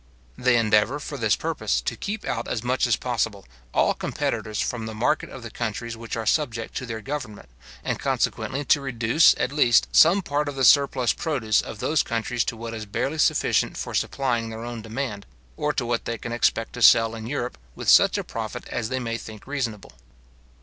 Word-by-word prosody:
They 125 -1 +3
endeavour, 110 +4 +2
for 145 - -6
this 110 -6 +2
purpose, - - -1
to - - -3
keep 215 +1 -5
out - - -2
as 115 - -3
much 125 +1 +1
as 120 - +3
possible 115 -5 -2 0.3
all - - +3
competitors 110 -1 -3
from 115 -2 -2
the 110 - -6
market 125 +7 0
of 130 - -10
the 115 - -8
countries 115 +1 -4
which 115 0 -6
are 115 -1 -3
subject 120 -3 -1
to 130 - -5
their 110 -1 -5
government, 125 - -6 0.3
and - - -2
consequently 140 +2 -1
to 145 - +3
reduce, 125 +2 +4
at - - -1
least, 125 -5 +4
some 180 +5 +6
part 145 -1 -1
of 145 - -6
the 135 -1 +2
surplus 135 -4 +4
produce 120 -10 0
of - - -8
those 150 +7 +1
countries 115 +1 -1
to 115 - -3
what 115 0 -6
is 110 -1 -6
barely 140 +9 -2
sufficient - - +2
for - - -5
supplying 120 -4 -1
their 110 +1 -7
own 120 -1 -6
demand, 115 -2 -5 0.3
or 150 - 0
to 130 - -1
what 120 0 -1
they 115 - -3
can 115 - -7
expect 115 -1 0
to 125 - -7
sell 115 -1 +6
in 110 0 -7
Europe, 125 - -3 0.2
with - - -7
such - - +6
a - - -2
profit 115 +2 -6
as 115 -2 -3
they 130 - -1
may 115 -2 -3
think 110 -1 -11
reasonable. 125 -7 -4
120 Hz, 205 wpm, -24 LUFS, 110-135 Hz, 0.3 s, some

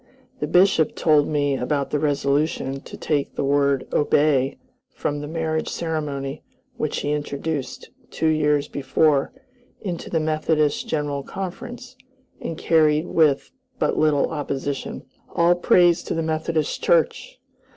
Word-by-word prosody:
The - - -2
Bishop 180 -4 +3
told 150 -3 +3
me 145 -2 +1
about 140 +2 -1
the 150 - +1
resolution 140 -1 0
to - - -10
take 145 -2 -1
the - - -1
word 140 -1 +2
"obey" 145 -2 +2 0.4
from 145 0 -2
the 145 - -5
marriage 160 0 -2
ceremony 150 -4 -3 0.3
which 155 - -2
he 145 - -1
introduced, 145 -1 -4 0.2
two - - -3
years 150 -2 +2
before, 140 0 +1 0.5
into 180 -4 -5
the 165 - +1
Methodist 155 -1 0
General 145 -2 -2
Conference 240 - -7 0.4
and 165 - -5
carried 155 -2 +3
with 145 -4 +2 0.3
but - - 0
little 150 -2 +2
opposition. 145 -2 -4 0.3
All 170 +1 +5
praise 175 -1 +4
to - - -2
the 165 - -1
Methodist 160 -1 -1
Church! - - +1
150 Hz, 130 wpm, -23 LUFS, 145-160 Hz, 0.5 s, All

